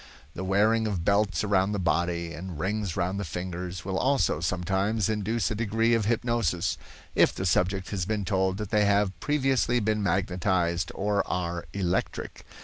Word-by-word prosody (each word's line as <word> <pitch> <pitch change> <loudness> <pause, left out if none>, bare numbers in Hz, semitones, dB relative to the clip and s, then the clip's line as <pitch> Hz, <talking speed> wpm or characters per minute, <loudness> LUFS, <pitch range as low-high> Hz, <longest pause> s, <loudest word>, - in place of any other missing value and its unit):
The 95 - -5
wearing 110 +4 +2
of 90 -5 -2
belts 100 -5 +2
around 100 -1 +2
the 100 - -1
body, 85 -1 0
and 90 0 -7
rings 100 0 -2
round 95 +3 -1
the - - -2
fingers, 90 0 -5
will 95 -1 -1
also, 135 - +2
sometimes, 95 +5 0
induce 110 +1 0
a - - -1
degree 115 +2 +1
of 115 -3 +2
hypnosis, 115 -6 0 0.4
if - - +4
the 95 - -3
subject 95 +2 +1
has 95 -4 -1
been 105 -2 -1
told 95 0 +1
that 105 -2 -5
they 105 -1 +3
have 100 -1 +2
previously 135 -4 +1
been 110 -1 0
magnetized 90 -2 0
or 100 +1 +1
are 85 -1 -2
electric. 95 -2 -3
95 Hz, 165 wpm, -27 LUFS, 90-105 Hz, 0.4 s, if